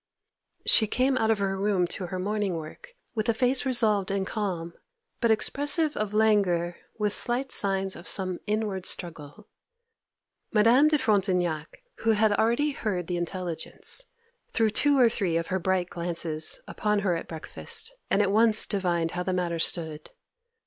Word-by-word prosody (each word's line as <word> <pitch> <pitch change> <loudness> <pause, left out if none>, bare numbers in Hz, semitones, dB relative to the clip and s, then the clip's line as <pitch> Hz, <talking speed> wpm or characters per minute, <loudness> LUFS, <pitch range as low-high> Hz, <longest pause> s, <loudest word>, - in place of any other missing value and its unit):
She 220 - +4
came 255 +5 +1
out 220 - +1
of 220 - +3
her 195 -1 -1
room 195 -3 +1
to 185 - -5
her 185 - -5
morning 205 0 -2
work 160 - -10 0.2
with 220 -1 -2
a 230 - +2
face 255 +3 +2
resolved 215 -6 +2
and 195 -1 -1
calm, 180 -6 -4 0.5
but 235 - +1
expressive 290 +7 +4
of 210 -1 -3
languor, 200 -6 +1 0.2
with 210 -1 0
slight 255 +3 +2
signs 195 -1 0
of 170 - -11
some 185 -2 +2
inward 210 -3 -2
struggle. 165 +2 -2 1.0
Madame 230 +7 +5
de 305 0 +3
Frontignac, 185 - -1
who 225 - +1
had 215 0 +2
already 235 +8 +1
heard 195 -9 -3
the 175 +1 -3
intelligence, 175 - -4 0.5
threw 225 -2 +2
two 285 +6 +3
or 250 -2 +6
three 190 -7 -1
of 165 - -4
her 190 - +1
bright 185 0 -1
glances 170 -2 -2
upon 210 0 -1
her 185 -4 0
at 165 - -6
breakfast, 165 - -4 0.2
and 205 - +3
at 195 - 0
once 220 +1 +4
divined 175 -5 -1
how 180 - -4
the 185 +1 -2
matter 175 -2 -2
stood. 160 -2 -1
200 Hz, 165 wpm, -26 LUFS, 175-220 Hz, 1.0 s, or